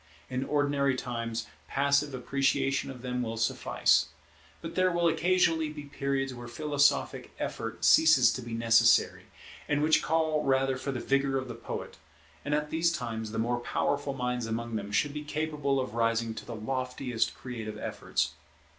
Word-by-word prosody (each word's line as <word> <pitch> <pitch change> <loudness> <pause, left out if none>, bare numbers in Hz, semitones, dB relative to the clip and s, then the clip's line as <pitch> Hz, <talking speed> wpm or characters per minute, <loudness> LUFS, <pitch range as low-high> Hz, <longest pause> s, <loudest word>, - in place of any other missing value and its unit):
In 130 +1 -1
ordinary 145 -2 +1
times 115 -2 -3 0.2
passive 140 0 +1
appreciation 135 +1 0
of 130 -2 -9
them 125 0 -2
will 115 -1 -3
suffice; 115 0 +2 0.5
but 165 0 -7
there 185 0 +2
will 170 0 +2
occasionally 165 -1 +2
be 150 -1 -8
periods 135 -1 -2
where 120 -1 -9
philosophic 145 +3 +1
effort - - -4
ceases 160 -5 +6
to 130 - -4
be 120 -1 -5
necessary, 115 0 +4 0.4
and 150 0 +1
which 155 +1 +4
call 160 -1 +1
rather 135 0 +2
for 135 +2 -4
the 130 - -3
vigour 135 +1 +1
of 130 0 -3
the 120 - -6
poet; 115 - -7 0.5
and 145 +1 0
at 150 0 -2
these 165 +1 +2
times 110 -9 -4
the - - -4
more 120 +2 0
powerful 140 +3 -1
minds 125 -2 -2
among 115 +1 -3
them 100 -1 -4
should 140 +8 +1
be 150 0 -5
capable 150 -2 -1
of 130 -4 -3
rising 115 0 +1
to - - -8
the 120 - -5
loftiest 125 +1 -2
creative 110 -4 -6
efforts. - - -2
135 Hz, 165 wpm, -29 LUFS, 120-150 Hz, 0.5 s, ceases